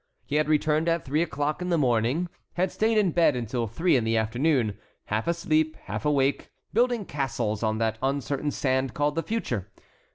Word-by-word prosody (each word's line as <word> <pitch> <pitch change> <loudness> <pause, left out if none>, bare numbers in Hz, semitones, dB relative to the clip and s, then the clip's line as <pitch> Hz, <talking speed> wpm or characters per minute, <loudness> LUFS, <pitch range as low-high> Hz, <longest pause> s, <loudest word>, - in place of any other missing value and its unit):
He 145 - -1
had 155 0 +1
returned 155 +1 +2
at 165 0 0
three 150 +4 +1
o'clock 150 -1 -1
in 180 - -2
the 170 - +2
morning, 125 +5 +1 0.3
had 180 +1 0
stayed 220 +1 +1
in 200 -5 +3
bed 165 -4 +3
until 120 0 -2
three 165 - +2
in 125 - +2
the 115 0 +1
afternoon, 120 0 +1 0.3
half 110 +5 -2
asleep, 155 -2 +1
half - - -5
awake, 140 -2 +1 0.2
building 240 -2 +2
castles 120 - -2
on 110 -1 0
that 110 0 -1
uncertain 140 +2 -1
sand 130 -2 0
called 145 0 +1
the 165 - -1
future. 125 - -3
145 Hz, 185 wpm, -26 LUFS, 120-165 Hz, 0.3 s, in